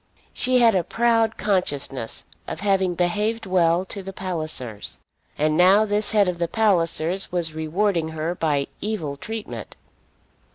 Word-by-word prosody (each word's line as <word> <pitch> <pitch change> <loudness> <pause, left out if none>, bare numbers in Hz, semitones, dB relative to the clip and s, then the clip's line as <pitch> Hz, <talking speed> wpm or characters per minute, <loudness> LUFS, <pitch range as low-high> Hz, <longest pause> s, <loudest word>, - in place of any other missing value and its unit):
She 255 0 +1
had 235 -2 +5
a 185 -2 +2
proud 225 +3 +1
consciousness 145 - -1 0.2
of 160 - -5
having 190 -3 +1
behaved 210 +6 0
well 180 -1 +2
to 200 +1 -7
the 195 0 -7
Pallisers, 155 - -4 0.4
and 155 +1 +1
now 190 +5 +5
this 205 0 +2
head 210 -3 +4
of 180 -1 -2
the 170 - 0
Pallisers 180 -3 +1
was 170 -3 -1
rewarding 165 +2 0
her 160 +2 -3
by 150 -5 0 0.2
evil 200 -10 -3
treatment. 220 +8 -7
180 Hz, 140 wpm, -23 LUFS, 160-210 Hz, 0.4 s, had